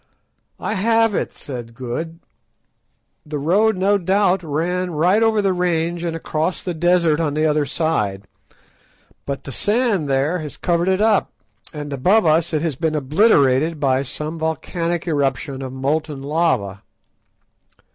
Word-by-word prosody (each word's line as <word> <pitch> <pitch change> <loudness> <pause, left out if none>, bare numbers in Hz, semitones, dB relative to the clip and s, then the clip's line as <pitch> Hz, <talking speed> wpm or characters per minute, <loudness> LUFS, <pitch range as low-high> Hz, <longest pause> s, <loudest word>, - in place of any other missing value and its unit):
"I - - -2
have 225 +2 +2
it!" - - -1
said 120 -4 -8
Good; 135 +7 -5 1.1
"the 150 -1 -5
road 195 +8 +2
no 200 +2 +2
doubt 190 +1 +2
ran 175 +4 -2
right 175 +6 +2
over 220 -2 +2
the 195 -1 +2
range 170 -1 -1
and 165 -1 -2
across 160 +2 -2
the 180 - -3
desert 170 -2 +2
on 150 -3 -1
the 155 +1 +1
other 150 -2 +1
side, 105 - -1 1.0
but 140 -1 -4
the 140 - -7
sand 205 - 0
there 140 +6 +1
has 150 -2 -7
covered 170 0 0
it 190 +1 +2
up, 215 -2 +2 0.4
and 145 -2 -6
above 185 +11 +3
us 160 +2 +2
it 155 -1 -1
has 160 -5 -1
been 160 +2 -1
obliterated 150 - +3
by 135 -2 +2
some 150 +4 -5
volcanic 165 +2 -2
eruption 140 -2 -1
of 130 -1 -5
molten 140 +2 -2
lava." 140 - 0
160 Hz, 145 wpm, -20 LUFS, 145-180 Hz, 1.1 s, above